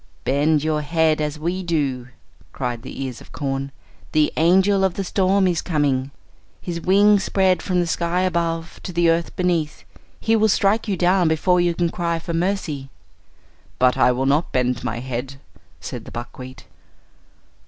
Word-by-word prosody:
"Bend 145 Hz, +2 st, +2 dB
your 155 Hz, -1 st, 0 dB
head 155 Hz, 0 st, +1 dB
as 150 Hz, 0 st, -2 dB
we 175 Hz, +4 st, -2 dB
do," 140 Hz, -8 st, -1 dB, 0.5 s
cried 120 Hz, -2 st, -3 dB
the 135 Hz, -, -6 dB
ears 130 Hz, -3 st, -6 dB
of -, -, -16 dB
corn; 135 Hz, -1 st, -3 dB, 0.4 s
"the 155 Hz, -1 st, +2 dB
angel 190 Hz, +4 st, +3 dB
of 190 Hz, -2 st, +1 dB
the 195 Hz, -, -2 dB
storm 190 Hz, +1 st, +2 dB
is 175 Hz, -3 st, 0 dB
coming; 140 Hz, -5 st, 0 dB, 0.5 s
his 170 Hz, -2 st, -5 dB
wings 200 Hz, +3 st, +4 dB
spread 190 Hz, -2 st, +2 dB
from 180 Hz, -2 st, 0 dB
the 175 Hz, -, +1 dB
sky 170 Hz, +1 st, 0 dB
above 170 Hz, -2 st, -2 dB
to -, -, -6 dB
the 170 Hz, -1 st, +3 dB
earth 165 Hz, 0 st, -1 dB
beneath. 170 Hz, -4 st, -1 dB, 0.4 s
He 225 Hz, -, +2 dB
will 220 Hz, 0 st, +3 dB
strike 205 Hz, +3 st, +2 dB
you 195 Hz, -3 st, -1 dB
down 180 Hz, 0 st, +3 dB
before 175 Hz, +3 st, +2 dB
you 175 Hz, -1 st, +1 dB
can 170 Hz, 0 st, 0 dB
cry 170 Hz, -1 st, -1 dB
for 165 Hz, +1 st, -5 dB
mercy." 165 Hz, -6 st, -2 dB, 0.9 s
"But 125 Hz, 0 st, +3 dB
I -, -, +4 dB
will 130 Hz, +2 st, -1 dB
not 145 Hz, +5 st, +1 dB
bend 125 Hz, -2 st, 0 dB
my 120 Hz, -1 st, -3 dB
head," 130 Hz, +1 st, -5 dB, 0.4 s
said -, -, -7 dB
the -, -, -10 dB
buckwheat. 125 Hz, +2 st, -9 dB
165 Hz, 170 wpm, -21 LUFS, 140-180 Hz, 0.9 s, wings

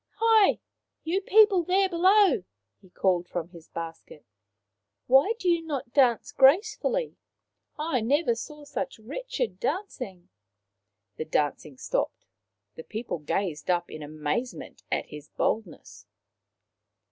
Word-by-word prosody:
" -, -, -54 dB
Hi! 445 Hz, -2 st, +4 dB, 0.5 s
you 355 Hz, +5 st, 0 dB
people 405 Hz, -1 st, +5 dB
there 375 Hz, +3 st, +2 dB
below/' 370 Hz, -, +4 dB, 0.4 s
he 190 Hz, -, -19 dB
called 180 Hz, -1 st, 0 dB
from 170 Hz, -1 st, -4 dB
his 170 Hz, -3 st, -14 dB
basket. 165 Hz, -2 st, -8 dB, 0.4 s
" 95 Hz, -, -57 dB, 0.3 s
Why 270 Hz, -, +5 dB
do 375 Hz, -, -4 dB
you 340 Hz, -1 st, +3 dB
not 280 Hz, -6 st, -5 dB
dance 250 Hz, -5 st, +3 dB
gracefully? 430 Hz, -, +3 dB, 0.6 s
I 300 Hz, -5 st, -1 dB
never 270 Hz, +3 st, +2 dB
saw 300 Hz, +6 st, -8 dB
such 275 Hz, -1 st, -5 dB
wretched -, -, -4 dB
dancing! 250 Hz, -, -4 dB, 0.4 s
" 100 Hz, 0 st, -56 dB
The 155 Hz, -, -3 dB
dancing 150 Hz, -2 st, -1 dB
stopped. -, -, -2 dB, 0.5 s
The 160 Hz, -, -10 dB
people 220 Hz, -4 st, -5 dB
gazed 150 Hz, 0 st, -3 dB
up 175 Hz, -1 st, 0 dB
in 155 Hz, -, -8 dB
amazement 150 Hz, -, -4 dB
at -, -, 0 dB
his 150 Hz, 0 st, -11 dB
boldness. 155 Hz, -, -3 dB
245 Hz, 130 wpm, -27 LUFS, -, 0.6 s, people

